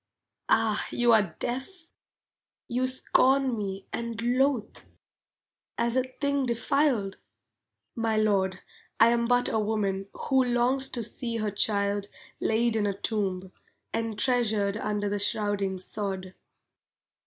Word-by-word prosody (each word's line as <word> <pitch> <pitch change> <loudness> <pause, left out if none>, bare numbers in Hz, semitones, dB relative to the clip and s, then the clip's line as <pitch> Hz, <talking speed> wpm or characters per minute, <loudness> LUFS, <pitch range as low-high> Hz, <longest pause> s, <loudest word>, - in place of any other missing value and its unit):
Ah, 220 -2 +2
you 240 -1 +3
are 200 -7 +3
deaf? 320 +8 -5 0.8
you 250 +2 0
scorn 260 0 +3
me 195 -2 -4
And 235 -2 -4
loathe, 250 0 +1 1.0
as 235 +1 0
a 260 - +4
thing 275 +1 -1
defiled? 235 -4 +1 0.8
My 225 -2 0
lord, 195 -3 +1 0.4
I 225 - +7
am 235 0 +1
but 245 0 +3
a 220 - 0
woman 200 -2 -1
Who 265 -1 +2
longs 250 +2 +1
to 235 - -3
see 235 +1 -1
her 215 -2 -1
child 200 0 0 0.3
Laid 225 +1 +1
in 210 -2 +1
a 200 -1 -3
tomb, 190 -4 -2 0.4
entreasured 220 -2 0
Under 210 -1 -2
the 205 0 -1
shrouding 200 -2 0
sod. 190 -1 -4
225 Hz, 120 wpm, -27 LUFS, 205-245 Hz, 1.0 s, I